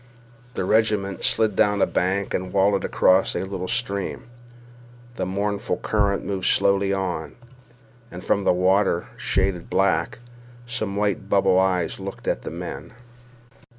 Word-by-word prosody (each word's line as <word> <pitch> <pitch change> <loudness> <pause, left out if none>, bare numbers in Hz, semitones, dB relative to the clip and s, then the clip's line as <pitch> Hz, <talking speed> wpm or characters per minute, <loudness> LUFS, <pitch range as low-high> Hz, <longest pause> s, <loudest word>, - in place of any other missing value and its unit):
The - - -2
regiment 105 -2 +1
slid 110 -3 +2
down 105 0 +2
a - - +4
bank 95 +2 -1
and 95 0 -3
wallowed 100 -1 +2
across 95 +1 +3
a - - -1
little 95 -1 -5
stream. 100 -4 -2 0.9
The 95 - -3
mournful 100 +3 -2
current 100 -2 0
moved 95 -2 -2
slowly 100 0 +3
on, 90 -6 -3 0.7
and 90 +1 -9
from 100 - +1
the - - +3
water, 95 0 +2
shaded 95 -2 -1
black, 95 0 +1 0.5
some 110 -5 -3
white 100 -1 -1
bubble 95 -2 +3
eyes 90 -3 0
looked 95 0 -8
at - - 0
the - - -6
men. - - -7
100 Hz, 140 wpm, -23 LUFS, 95-100 Hz, 0.9 s, a